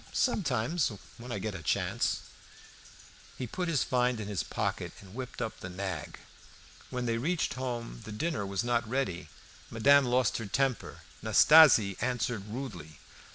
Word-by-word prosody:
"Sometimes, 150 Hz, -, +1 dB, 0.3 s
when 125 Hz, +1 st, -8 dB
I 105 Hz, -, -2 dB
get 105 Hz, +2 st, -3 dB
a 95 Hz, -, -7 dB
chance." -, -, 0 dB, 1.2 s
He 130 Hz, -, -3 dB
put 180 Hz, +9 st, -3 dB
his 160 Hz, -6 st, +2 dB
find 125 Hz, -2 st, +1 dB
in 105 Hz, -, -5 dB
his 100 Hz, -6 st, -2 dB
pocket -, -, -3 dB
and 95 Hz, -1 st, -14 dB
whipped 125 Hz, 0 st, -5 dB
up 110 Hz, -, -5 dB
the 90 Hz, -, -7 dB
nag. 95 Hz, +1 st, -5 dB, 0.7 s
When 125 Hz, -1 st, -3 dB
they 115 Hz, -1 st, 0 dB
reached 165 Hz, +6 st, 0 dB
home 120 Hz, -, -5 dB
the 110 Hz, -, -8 dB
dinner 140 Hz, +2 st, -2 dB
was 100 Hz, +2 st, -2 dB
not 120 Hz, -2 st, 0 dB
ready. 95 Hz, -11 st, -2 dB, 0.4 s
Madame 140 Hz, +5 st, +5 dB
lost 125 Hz, -2 st, +1 dB
her 115 Hz, -, -5 dB
temper. 130 Hz, +4 st, -1 dB, 0.2 s
Nastasie 135 Hz, -, +7 dB
answered 120 Hz, -3 st, -1 dB
rudely. 100 Hz, -, -7 dB
120 Hz, 155 wpm, -30 LUFS, 100-130 Hz, 1.2 s, Nastasie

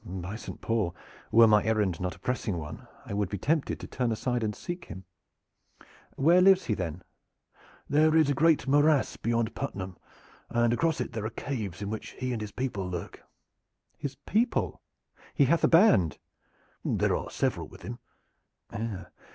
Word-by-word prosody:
"By 95 Hz, +2 st, -6 dB
Saint 115 Hz, -, -8 dB
Paul! 110 Hz, -6 st, 0 dB, 0.4 s
were 115 Hz, +1 st, +8 dB
my 105 Hz, -1 st, +5 dB
errand 105 Hz, -6 st, 0 dB
not 90 Hz, 0 st, -2 dB
a -, -, -19 dB
pressing 120 Hz, -6 st, -2 dB
one 75 Hz, -2 st, -8 dB, 0.2 s
I -, -, -6 dB
would 100 Hz, -2 st, 0 dB
be 100 Hz, -, -3 dB
tempted 150 Hz, -, 0 dB
to -, -, -7 dB
turn 125 Hz, -3 st, -1 dB
aside 120 Hz, +2 st, -1 dB
and 105 Hz, -2 st, -1 dB
seek 175 Hz, -1 st, -6 dB
him. 95 Hz, +1 st, -9 dB, 1.1 s
Where 170 Hz, +6 st, +5 dB
lives 190 Hz, 0 st, +6 dB
he, 110 Hz, -, 0 dB
then?" 90 Hz, -3 st, -4 dB, 0.8 s
"There 155 Hz, +2 st, +4 dB
is 160 Hz, -2 st, +5 dB
a 145 Hz, -, +2 dB
great 155 Hz, -2 st, +3 dB
morass 145 Hz, +1 st, +3 dB
beyond 115 Hz, -1 st, -1 dB
Puttenham, 95 Hz, -2 st, -5 dB, 0.5 s
and 120 Hz, 0 st, +2 dB
across 160 Hz, +1 st, +1 dB
it 120 Hz, -, -4 dB
there 110 Hz, -1 st, -2 dB
are -, -, -4 dB
caves 105 Hz, -7 st, -5 dB
in 100 Hz, -, -3 dB
which 110 Hz, -, -6 dB
he 130 Hz, 0 st, -2 dB
and 115 Hz, -, -3 dB
his 105 Hz, -1 st, -5 dB
people 100 Hz, -7 st, -3 dB
lurk." 90 Hz, +2 st, -6 dB, 0.7 s
"His 140 Hz, -2 st, -5 dB
people? 230 Hz, +4 st, 0 dB, 0.5 s
He 140 Hz, -, +5 dB
hath 165 Hz, +6 st, +2 dB
a -, -, +7 dB
band?" 125 Hz, -, +5 dB, 0.7 s
"There -, -, +1 dB
are -, -, -4 dB
several -, -, -1 dB
with -, -, -15 dB
him." 120 Hz, +1 st, -6 dB
115 Hz, 170 wpm, -28 LUFS, 100-145 Hz, 1.1 s, were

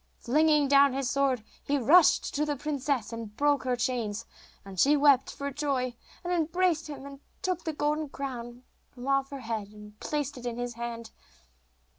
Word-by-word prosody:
Flinging 300 Hz, +3 st, +3 dB
down 280 Hz, -1 st, +5 dB
his 270 Hz, -1 st, -1 dB
sword 275 Hz, -5 st, +1 dB, 0.2 s
he 285 Hz, -, 0 dB
rushed 300 Hz, +6 st, +5 dB
to 295 Hz, -, 0 dB
the 295 Hz, -1 st, -1 dB
princess 280 Hz, -4 st, -2 dB
and 225 Hz, -2 st, -7 dB
broke 290 Hz, -1 st, +2 dB
her 250 Hz, -1 st, +1 dB
chains, 230 Hz, -3 st, -2 dB, 0.4 s
and 195 Hz, -2 st, -8 dB
she 290 Hz, +7 st, +5 dB
wept 280 Hz, -2 st, +5 dB
for 280 Hz, 0 st, -5 dB
joy, 265 Hz, -4 st, -1 dB, 0.3 s
and 355 Hz, 0 st, -1 dB
embraced 335 Hz, 0 st, +1 dB
him, 280 Hz, -2 st, -8 dB
and 280 Hz, -1 st, -10 dB, 0.2 s
took 365 Hz, -2 st, -2 dB
the 320 Hz, -, -2 dB
golden 300 Hz, 0 st, -1 dB
crown 245 Hz, -3 st, -6 dB, 0.3 s
from 250 Hz, 0 st, -10 dB
off 275 Hz, 0 st, +2 dB
her 275 Hz, -2 st, -7 dB
head, 220 Hz, -3 st, -3 dB
and 210 Hz, 0 st, -14 dB
placed 285 Hz, -3 st, -3 dB
it 245 Hz, -, -10 dB
in 235 Hz, -1 st, -4 dB
his 245 Hz, 0 st, -3 dB
hand. 230 Hz, -1 st, -6 dB
275 Hz, 180 wpm, -28 LUFS, 240-295 Hz, 0.4 s, down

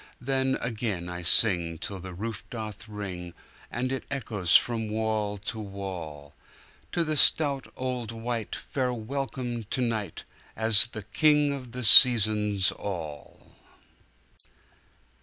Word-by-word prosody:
Then 130 Hz, +1 st, -1 dB
again 105 Hz, -7 st, -4 dB
I 90 Hz, 0 st, -6 dB
sing 85 Hz, -3 st, +3 dB
'till 95 Hz, +3 st, -6 dB
the 95 Hz, +1 st, -9 dB
roof 110 Hz, +3 st, -6 dB
doth 110 Hz, -3 st, -8 dB
ring, 90 Hz, -5 st, -7 dB, 0.3 s
And 130 Hz, +2 st, -3 dB
it 135 Hz, -, -4 dB
echoes 105 Hz, -10 st, -1 dB
from 115 Hz, -2 st, +2 dB
wall 110 Hz, -1 st, -2 dB
to 110 Hz, +3 st, -6 dB
wall—To 95 Hz, -, -8 dB
the 155 Hz, -1 st, -2 dB
stout 140 Hz, -2 st, +3 dB
old 125 Hz, -3 st, -4 dB
wight, 115 Hz, -1 st, -5 dB
fair 130 Hz, -2 st, -3 dB
welcome 125 Hz, 0 st, -5 dB
to 115 Hz, -, -3 dB
night, 115 Hz, -4 st, -3 dB, 0.3 s
As 110 Hz, 0 st, +6 dB
the 110 Hz, -3 st, -9 dB
King 150 Hz, +4 st, +2 dB
of 130 Hz, -4 st, -9 dB
the 125 Hz, 0 st, -4 dB
Seasons 105 Hz, -4 st, +6 dB
all! 80 Hz, -8 st, -8 dB
110 Hz, 120 wpm, -26 LUFS, 100-125 Hz, 0.3 s, As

